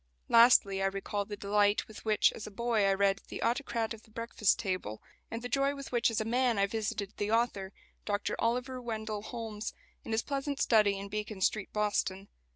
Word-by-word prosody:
Lastly 230 Hz, -5 st, +6 dB
I 195 Hz, -, +3 dB
recall 200 Hz, +1 st, -3 dB
the 205 Hz, 0 st, -7 dB
delight 205 Hz, +1 st, +2 dB
with 220 Hz, -, -11 dB
which 215 Hz, -1 st, +3 dB
as -, -, -7 dB
a -, -, -6 dB
boy 220 Hz, -1 st, +1 dB
I 195 Hz, -, +4 dB
read 195 Hz, 0 st, +2 dB
the -, -, -5 dB
"Autocrat 235 Hz, -3 st, 0 dB
of 220 Hz, -, -11 dB
the 225 Hz, -, -22 dB
Breakfast 230 Hz, -2 st, +1 dB
Table," 185 Hz, -, -3 dB, 0.3 s
and 230 Hz, +1 st, -5 dB
the -, -, -2 dB
joy 275 Hz, +3 st, +1 dB
with 275 Hz, -1 st, -8 dB
which 240 Hz, -1 st, +3 dB
as 225 Hz, -, -1 dB
a 220 Hz, -, -1 dB
man 245 Hz, 0 st, +2 dB
I 200 Hz, -, +4 dB
visited 210 Hz, -1 st, -3 dB
the 205 Hz, -, -1 dB
author, 225 Hz, -4 st, 0 dB, 0.3 s
Dr 205 Hz, -1 st, -1 dB
Oliver 250 Hz, +2 st, -1 dB
Wendell 220 Hz, -3 st, -4 dB
Holmes, 220 Hz, -2 st, -6 dB, 0.3 s
in -, -, -7 dB
his 220 Hz, 0 st, +1 dB
pleasant 280 Hz, 0 st, -3 dB
study 210 Hz, -3 st, +4 dB
in 200 Hz, +1 st, -6 dB
Beacon 210 Hz, 0 st, -4 dB
Street, 200 Hz, +2 st, 0 dB
Boston. 205 Hz, -2 st, -1 dB
215 Hz, 200 wpm, -31 LUFS, 200-235 Hz, 0.3 s, Lastly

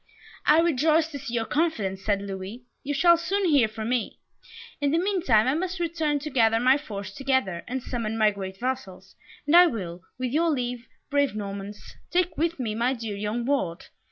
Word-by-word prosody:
"I 310 Hz, +2 st, +6 dB
rejoice 320 Hz, 0 st, +2 dB
to 285 Hz, -, -6 dB
see 260 Hz, -3 st, -5 dB
your 225 Hz, -1 st, 0 dB
confidence," 210 Hz, -, -1 dB
said 200 Hz, -1 st, 0 dB
Louis. 195 Hz, +4 st, -7 dB, 0.2 s
"You 285 Hz, -, -4 dB
shall 340 Hz, +4 st, +6 dB
soon 385 Hz, +4 st, -1 dB
hear 285 Hz, -9 st, +4 dB
from 220 Hz, +1 st, -5 dB
me. 245 Hz, -3 st, -1 dB, 0.6 s
In 285 Hz, -, +2 dB
the 315 Hz, -, +2 dB
meantime 335 Hz, -, +2 dB
I 260 Hz, -, +3 dB
must 365 Hz, +3 st, -2 dB
return 320 Hz, -3 st, 0 dB
to 305 Hz, +1 st, -5 dB
gather 225 Hz, -3 st, +3 dB
my 255 Hz, +3 st, +5 dB
force 200 Hz, -9 st, -6 dB
together, 260 Hz, -10 st, -1 dB
and 255 Hz, +1 st, -4 dB
summon 225 Hz, -2 st, -3 dB
my 215 Hz, -1 st, +4 dB
great 190 Hz, -1 st, -7 dB
vassals, 240 Hz, -7 st, -4 dB, 0.3 s
and 295 Hz, +3 st, +3 dB
I 355 Hz, 0 st, +9 dB
will, 180 Hz, -, -5 dB, 0.2 s
with 255 Hz, -1 st, -2 dB
your 330 Hz, +4 st, +2 dB
leave, 245 Hz, -4 st, -2 dB, 0.2 s
brave 285 Hz, -5 st, +2 dB
Normans, 200 Hz, 0 st, -7 dB
take 355 Hz, -1 st, +1 dB
with 330 Hz, 0 st, -1 dB
me 225 Hz, -4 st, -2 dB
my 240 Hz, +4 st, +1 dB
dear 225 Hz, -4 st, -5 dB
young 210 Hz, +4 st, -3 dB
ward. 240 Hz, -11 st, -1 dB
250 Hz, 190 wpm, -26 LUFS, 210-310 Hz, 0.6 s, I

